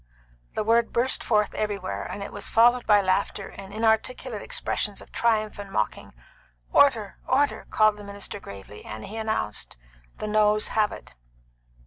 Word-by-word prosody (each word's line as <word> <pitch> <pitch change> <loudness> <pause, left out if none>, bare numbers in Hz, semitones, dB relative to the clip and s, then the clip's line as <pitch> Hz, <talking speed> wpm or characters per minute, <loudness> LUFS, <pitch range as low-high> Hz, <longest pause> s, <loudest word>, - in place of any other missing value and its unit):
The - - 0
word 230 +2 +3
burst 255 +3 +1
forth 210 -2 +2
everywhere, 200 - -2
and 200 - -5
it - - -8
was - - -2
followed 240 +2 +4
by 210 -1 +6
laughter 195 +1 0
and 195 0 -10
inarticulate 220 +1 0
expressions 205 -2 -1
of - - -12
triumph 215 -3 +1
and 200 -1 -7
mocking. 110 - -2 0.6
"Order! 225 -8 +4
order!" 285 +1 +1
called 215 -1 +3
the 205 - -10
minister 200 0 -5
gravely, 100 - -11
and 110 0 -7
he 220 - -7
announced, 220 - -2 0.4
"The - - -4
noes 210 0 +3
have 215 -1 +2
it." - - -10
210 Hz, 155 wpm, -26 LUFS, 200-225 Hz, 0.6 s, by